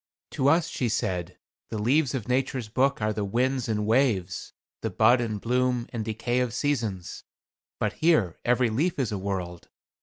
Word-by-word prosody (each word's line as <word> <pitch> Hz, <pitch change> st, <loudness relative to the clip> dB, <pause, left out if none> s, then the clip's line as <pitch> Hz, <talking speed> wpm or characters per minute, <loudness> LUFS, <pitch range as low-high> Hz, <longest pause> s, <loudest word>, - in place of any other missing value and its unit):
"To 135 Hz, -, 0 dB
us," 165 Hz, +3 st, +4 dB
she 125 Hz, -7 st, -2 dB
said, 90 Hz, -4 st, -2 dB, 0.3 s
"the 110 Hz, -, -4 dB
leaves 135 Hz, +6 st, +2 dB
of 120 Hz, -6 st, -4 dB
Nature's 130 Hz, -2 st, -1 dB
book 135 Hz, +1 st, +1 dB
are 110 Hz, 0 st, +1 dB
the 105 Hz, -, -2 dB
winds 125 Hz, +4 st, 0 dB
and 105 Hz, -1 st, 0 dB
waves, 110 Hz, -6 st, +1 dB, 0.3 s
the -, -, -1 dB
bud 120 Hz, 0 st, +4 dB
and 110 Hz, -3 st, -2 dB
bloom 125 Hz, +1 st, +1 dB
and 115 Hz, -2 st, -2 dB
decay 115 Hz, +3 st, -1 dB
of 125 Hz, -2 st, -1 dB
seasons. 115 Hz, -11 st, -2 dB, 0.6 s
But -, -, 0 dB
here 155 Hz, -, +2 dB
every 125 Hz, -1 st, +2 dB
leaf 155 Hz, +10 st, 0 dB
is 130 Hz, -6 st, -1 dB
a 100 Hz, -, -2 dB
world. 90 Hz, -3 st, -4 dB
120 Hz, 175 wpm, -26 LUFS, 105-130 Hz, 0.6 s, us